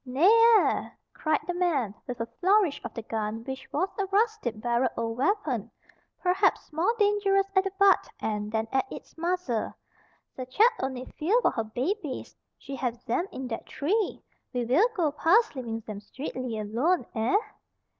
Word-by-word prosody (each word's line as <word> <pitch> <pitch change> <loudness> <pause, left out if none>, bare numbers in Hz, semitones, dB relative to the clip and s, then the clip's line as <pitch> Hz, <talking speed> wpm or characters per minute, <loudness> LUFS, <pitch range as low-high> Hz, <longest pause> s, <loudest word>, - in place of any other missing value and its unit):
"Nev 280 +10 +4 0.3
air!" - - 0 0.2
cried 310 -2 0
the 355 - -2
man, 315 - 0
with 250 -1 -5
a 230 - -1
flourish 380 -4 +3
of - - -5
the 230 - -5
gun 220 0 -3
which 265 +2 -7
was 345 +6 +1
a 390 - 0
rusty 430 - +1
barreled 240 +3 0
old 230 0 -2
weapon, 290 - 0 0.5
perhaps 370 -2 +2
more 330 +8 +2
dangerous 405 -2 +3
at 380 0 +4
the 390 - -1
butt 395 -1 +4
end 210 -1 -2
than 220 0 -1
at 270 +9 0
its - - -10
muzzle. 335 -9 -1 0.6
"Ze 255 - -5
chat 430 - +5
only 260 -1 -3
fear 390 +11 +3
for - - +4
her 225 - -2
babies. 270 - -3 0.2
She 275 - -7
have 245 -2 -1
zem 245 +10 -1
in 260 - -6
dat 225 -2 -5
tree. 395 +8 -1 0.3
We 245 -1 -1
will 315 - +4
go 330 -7 +1
past 355 +8 +3
leeving 230 -3 -4
zem 215 -2 -7
streectly 255 +1 -5
alone, 240 - 0
eh?" 225 - +2
275 Hz, 170 wpm, -27 LUFS, 235-380 Hz, 0.6 s, chat